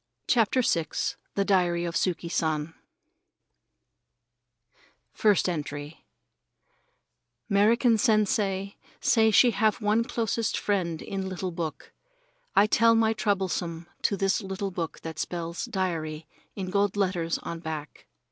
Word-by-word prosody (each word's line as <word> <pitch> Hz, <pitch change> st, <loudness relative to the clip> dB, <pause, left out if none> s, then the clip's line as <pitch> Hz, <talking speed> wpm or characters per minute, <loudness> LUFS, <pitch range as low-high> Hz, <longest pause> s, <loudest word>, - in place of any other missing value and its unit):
CHAPTER 245 Hz, +2 st, +3 dB
VI 165 Hz, -7 st, +1 dB, 0.5 s
THE 200 Hz, -, +1 dB
DIARY 175 Hz, -3 st, +2 dB
OF 170 Hz, -, -3 dB
YUKI 170 Hz, 0 st, -1 dB
SAN 160 Hz, -2 st, -1 dB, 2.4 s
First 210 Hz, -4 st, +3 dB
Entry 150 Hz, -2 st, -5 dB, 1.4 s
'Merican 225 Hz, +3 st, +4 dB
Sensei 205 Hz, -3 st, +1 dB, 0.2 s
say 220 Hz, -1 st, +4 dB
she 240 Hz, +3 st, +6 dB
have 220 Hz, -1 st, +1 dB
one 215 Hz, +1 st, +2 dB
closest 230 Hz, -1 st, -1 dB
friend 175 Hz, -6 st, -1 dB
in 195 Hz, -1 st, -4 dB
little 185 Hz, 0 st, -4 dB
book. 165 Hz, -2 st, -5 dB, 0.6 s
I -, -, +6 dB
tell 230 Hz, +2 st, +4 dB
my 225 Hz, 0 st, +3 dB
troublesome 185 Hz, -5 st, -1 dB, 0.2 s
to 200 Hz, -, +1 dB
this 195 Hz, +4 st, +1 dB
little 195 Hz, 0 st, -4 dB
book 170 Hz, -3 st, -4 dB
what 160 Hz, -1 st, -6 dB
spells 170 Hz, -1 st, -3 dB
"Diary" 160 Hz, -4 st, -3 dB, 0.3 s
in 185 Hz, -2 st, -4 dB
gold 200 Hz, 0 st, +1 dB
letters 180 Hz, -4 st, 0 dB
on 170 Hz, -, -6 dB
back. 155 Hz, -2 st, -7 dB
190 Hz, 120 wpm, -27 LUFS, 170-210 Hz, 2.4 s, she